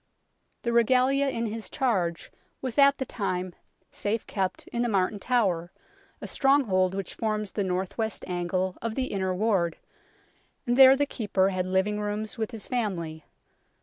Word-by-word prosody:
The 235 - -1
Regalia 255 +4 +3
in 230 -3 -2
Ms 225 0 -4
charge 185 -10 -1 0.3
was 255 0 -2
at 280 0 +6
the 265 - -3
time 185 -6 -3 0.4
safe 215 +2 -2
kept 190 -2 -3
in 235 - -2
the 240 - +1
Martin 200 0 +1
Tower, 190 -8 0 0.5
a - - -7
stronghold 210 -10 +2
which 195 -2 -4
forms 215 -2 -2
the 205 - -1
north 185 +3 -3
west 220 -2 -2
angle 180 +1 -2
of 230 -1 -3
the 260 -1 -2
Inner 190 -1 0
Ward, 185 -5 +1 0.9
and 240 -1 +1
there 265 0 +9
the 285 +1 +1
Keeper 200 -8 0
had 185 -1 -2
living 190 +3 +1
rooms 210 +1 -3
with 220 - -1
his 225 -4 -3
family. 170 - -3
210 Hz, 160 wpm, -27 LUFS, 185-240 Hz, 0.9 s, there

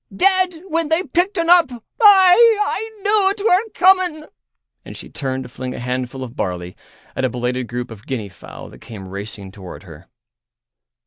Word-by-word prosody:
Dead 370 -2 +1
when 330 -2 -1
they 325 +3 +1
picked 380 +3 -1
un 335 -1 0
up. 345 -4 +5
Aye, 405 - +5
I 425 +1 -2
knew 405 -2 +3
'twere 400 -2 +2
coming." 365 -4 +3 0.6
And - - -10
she - - -10
turned 130 -1 -4
to - - -10
fling 130 +1 -7
a - - -7
handful 125 +1 -4
of 120 -1 -9
barley 90 -1 -4 0.4
at - - -3
a 130 - +1
belated 125 +1 -3
group 120 +1 -5
of 110 0 -13
guinea 120 -6 -4
fowl 90 -3 -12
that 60 - -16
came 100 -4 -10
racing 100 0 -8
toward 95 -2 -11
her. 80 -5 -14
135 Hz, 175 wpm, -19 LUFS, -, 0.6 s, up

